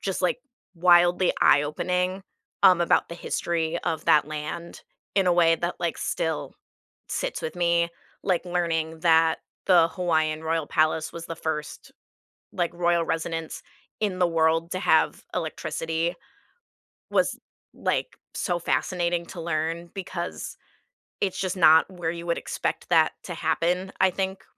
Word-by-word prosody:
just, 195 Hz, -1 st, -3 dB
like, 180 Hz, +6 st, +1 dB, 0.4 s
wildly 175 Hz, +1 st, +5 dB
eye-opening, 180 Hz, +6 st, +2 dB, 0.4 s
um, 185 Hz, -3 st, +7 dB
about 170 Hz, -, +2 dB
the 170 Hz, -, -7 dB
history 170 Hz, -1 st, -2 dB
of 160 Hz, -, -3 dB
that 145 Hz, 0 st, +4 dB
land 155 Hz, +3 st, -6 dB, 0.3 s
in 195 Hz, -2 st, +3 dB
a 180 Hz, -, +5 dB
way 165 Hz, -1 st, +4 dB
that, 175 Hz, +2 st, -3 dB
like, 170 Hz, -, -1 dB
still 160 Hz, -2 st, -2 dB, 0.6 s
sits -, -, -3 dB
with 160 Hz, -, -4 dB
me. 170 Hz, -1 st, +2 dB, 0.3 s
Like, 185 Hz, -2 st, 0 dB
learning 165 Hz, -2 st, -1 dB
that 165 Hz, -1 st, +4 dB, 0.3 s
the 175 Hz, -3 st, +6 dB
Hawaiian 160 Hz, -4 st, 0 dB
royal 160 Hz, -1 st, -1 dB
palace 155 Hz, -1 st, +1 dB
was 170 Hz, 0 st, -7 dB
the 165 Hz, -, -5 dB
1st, 160 Hz, -2 st, -5 dB, 0.6 s
like, 175 Hz, -1 st, -1 dB
royal 170 Hz, -1 st, +2 dB
residence 165 Hz, 0 st, -3 dB, 0.4 s
in 200 Hz, -4 st, -1 dB
the 180 Hz, -, +4 dB
world 165 Hz, 0 st, +1 dB
to 185 Hz, -, -2 dB
have -, -, +2 dB
electricity 165 Hz, +2 st, -2 dB, 1.0 s
was, -, -, +1 dB, 0.4 s
like, -, -, -2 dB, 0.2 s
so 175 Hz, -2 st, -1 dB
fascinating 175 Hz, 0 st, 0 dB
to 175 Hz, -, -8 dB
learn 165 Hz, +1 st, -2 dB
because 180 Hz, -3 st, -5 dB, 0.7 s
it's 195 Hz, -2 st, -1 dB
just 185 Hz, -1 st, -1 dB
not 160 Hz, -2 st, +6 dB
where 175 Hz, -3 st, -3 dB
you 170 Hz, 0 st, -7 dB
would 170 Hz, -1 st, 0 dB
expect -, -, -3 dB
that 160 Hz, -2 st, +4 dB
to 180 Hz, -, -6 dB
happen, 175 Hz, +4 st, 0 dB
I 190 Hz, -, +6 dB
think, 190 Hz, +1 st, -3 dB
170 Hz, 140 wpm, -25 LUFS, 160-180 Hz, 1.0 s, um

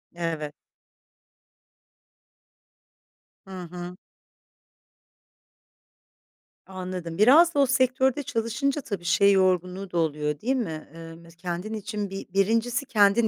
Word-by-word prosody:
Evet. 160 Hz, -3 st, -3 dB, 2.9 s
Hı -, -, -11 dB, 0.2 s
hı. 180 Hz, 0 st, -7 dB, 2.7 s
Anladım. 185 Hz, -3 st, -6 dB
Biraz 305 Hz, +11 st, +6 dB
da -, -, +2 dB
o 280 Hz, -, +6 dB
sektörde 260 Hz, +2 st, +2 dB
çalışınca 260 Hz, +6 st, -1 dB
tabii 200 Hz, -8 st, -5 dB
şey 200 Hz, +3 st, +4 dB
yorgunluğu 185 Hz, 0 st, +1 dB
da 175 Hz, -, -2 dB
oluyor, 150 Hz, -2 st, -1 dB
değil 260 Hz, +4 st, +1 dB
mi? 165 Hz, -12 st, -4 dB
Eee, 165 Hz, 0 st, -10 dB
mes 170 Hz, 0 st, -16 dB
kendin 180 Hz, +4 st, -5 dB
için 210 Hz, -1 st, -4 dB
bir 195 Hz, +1 st, -6 dB
1'incisi 230 Hz, +7 st, +1 dB
kendin 210 Hz, +1 st, +4 dB
195 Hz, 105 wpm, -26 LUFS, 170-235 Hz, 2.9 s, Biraz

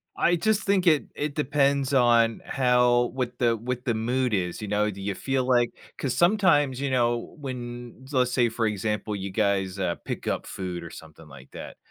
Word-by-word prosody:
I 175 Hz, -, +3 dB
just 220 Hz, +4 st, +1 dB
think 195 Hz, -2 st, +1 dB
it 155 Hz, -4 st, +4 dB
it 150 Hz, 0 st, -3 dB
depends 140 Hz, -2 st, +1 dB
on 120 Hz, -3 st, +3 dB
how 125 Hz, -1 st, +3 dB
what 125 Hz, -2 st, -3 dB
the 115 Hz, -2 st, +2 dB
what 125 Hz, +2 st, -4 dB
the 120 Hz, -, +1 dB
mood 125 Hz, +2 st, 0 dB
is, 90 Hz, +1 st, -1 dB
you 105 Hz, -, -5 dB
know? 105 Hz, +1 st, +1 dB
Do 100 Hz, -, -9 dB
you 100 Hz, 0 st, -3 dB
feel 135 Hz, +5 st, -1 dB
like 120 Hz, -2 st, +3 dB, 0.3 s
'cause 130 Hz, -3 st, -2 dB
sometimes, 160 Hz, -, +3 dB
you 140 Hz, -1 st, -2 dB
know, 120 Hz, -2 st, 0 dB
when 120 Hz, -2 st, -7 dB
let's 125 Hz, -2 st, +2 dB
say 120 Hz, -2 st, +2 dB
for 115 Hz, -1 st, -1 dB
example, 105 Hz, +1 st, -2 dB
you 95 Hz, -1 st, -5 dB
guys, 100 Hz, -2 st, 0 dB
uh, 85 Hz, -2 st, 0 dB
pick -, -, -5 dB
up -, -, -1 dB
food, 90 Hz, -2 st, -5 dB
or 85 Hz, -, -9 dB
something 80 Hz, 0 st, -13 dB
like 70 Hz, -2 st, -14 dB
that, -, -, -9 dB
120 Hz, 195 wpm, -26 LUFS, 105-135 Hz, 0.3 s, it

